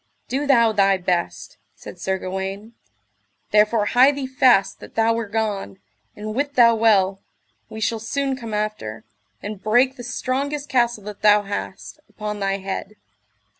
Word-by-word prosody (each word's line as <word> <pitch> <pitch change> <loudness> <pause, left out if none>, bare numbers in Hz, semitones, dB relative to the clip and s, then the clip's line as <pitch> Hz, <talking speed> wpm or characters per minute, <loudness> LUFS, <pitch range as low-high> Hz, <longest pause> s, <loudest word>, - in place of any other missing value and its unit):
Do 280 +3 -2
thou 235 -5 +5
thy 195 -2 +3
best, 180 -1 -3 0.2
said - - -11
Sir 190 0 -1
Gawaine; 190 +4 -5 0.8
therefore 210 0 +3
hie 255 +6 +5
thee 280 -1 -4
fast 255 -6 +3
that - - -13
thou 225 0 +3
were 230 -1 -3
gone, 205 -2 -3 0.4
and 215 +1 -6
wit 285 +3 -2
thou 235 -2 +6
well 195 -4 +2 0.5
we 220 - -8
shall 225 +1 -1
soon 270 +4 -2
come 230 -4 -8
after, 210 - -4 0.4
and 205 -1 -6
break 250 +6 +2
the 245 - -8
strongest 275 +4 -3
castle 240 -5 +1
that 210 0 -9
thou 210 -1 +5
hast, 200 +7 -6
upon 210 -1 -5
thy 195 0 0
head. 195 +2 -6
215 Hz, 155 wpm, -22 LUFS, 195-245 Hz, 0.8 s, thou